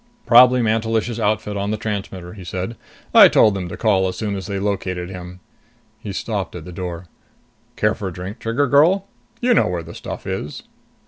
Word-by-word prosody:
"Probably 125 Hz, +1 st, +7 dB
Mantelish's 115 Hz, +1 st, 0 dB
outfit 105 Hz, -1 st, 0 dB
on 100 Hz, 0 st, -2 dB
the 110 Hz, -, -1 dB
transmitter," 95 Hz, -4 st, -5 dB
he 100 Hz, -3 st, -10 dB
said. 95 Hz, +5 st, -4 dB, 0.4 s
"I -, -, +10 dB
told 105 Hz, -, +4 dB
them 95 Hz, -3 st, -4 dB
to -, -, -7 dB
call 95 Hz, -4 st, +2 dB
as 90 Hz, -, -4 dB
soon 105 Hz, -2 st, -2 dB
as 95 Hz, -2 st, -6 dB
they 100 Hz, -1 st, -3 dB
located 95 Hz, -3 st, -2 dB
him." 90 Hz, 0 st, -9 dB, 0.6 s
He 100 Hz, -, -6 dB
stopped 100 Hz, -3 st, -3 dB
at 85 Hz, -3 st, -8 dB
the 90 Hz, -, -8 dB
door. 90 Hz, -1 st, -6 dB, 0.7 s
"Care 105 Hz, 0 st, +2 dB
for 100 Hz, -, -5 dB
a -, -, -4 dB
drink, 90 Hz, +4 st, -7 dB
Trigger 115 Hz, +6 st, 0 dB
girl? 160 Hz, +9 st, +4 dB, 0.4 s
You 245 Hz, 0 st, +3 dB
know -, -, +3 dB
where 90 Hz, -2 st, -3 dB
the 85 Hz, +1 st, -10 dB
stuff -, -, -7 dB
is." 75 Hz, -, -5 dB
100 Hz, 195 wpm, -20 LUFS, 90-110 Hz, 0.7 s, I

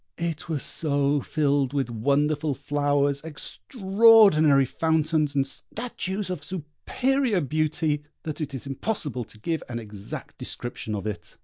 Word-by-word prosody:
It 170 Hz, -1 st, -3 dB
was 150 Hz, -5 st, -2 dB
so 145 Hz, -2 st, +1 dB
filled 140 Hz, -2 st, +1 dB
with 135 Hz, -4 st, -1 dB
wonderful 145 Hz, +5 st, +1 dB
flowers, 145 Hz, 0 st, +1 dB
extraordinary 190 Hz, -, +4 dB
fountains, 155 Hz, 0 st, +1 dB
and 135 Hz, -1 st, +3 dB
statues 200 Hz, -, -4 dB
of 170 Hz, -6 st, -4 dB
superior 200 Hz, -, -1 dB
beauty, 155 Hz, 0 st, 0 dB, 0.2 s
that 155 Hz, 0 st, -5 dB
it 140 Hz, -2 st, -3 dB
is 130 Hz, -, -6 dB
impossible 135 Hz, -, -3 dB
to 110 Hz, -, -13 dB
give 160 Hz, +8 st, -2 dB
an 120 Hz, -, -3 dB
exact 105 Hz, -3 st, -8 dB
description 110 Hz, -3 st, -4 dB
of 100 Hz, -, -5 dB
it. 105 Hz, -2 st, -6 dB
150 Hz, 130 wpm, -26 LUFS, 140-165 Hz, 0.2 s, extraordinary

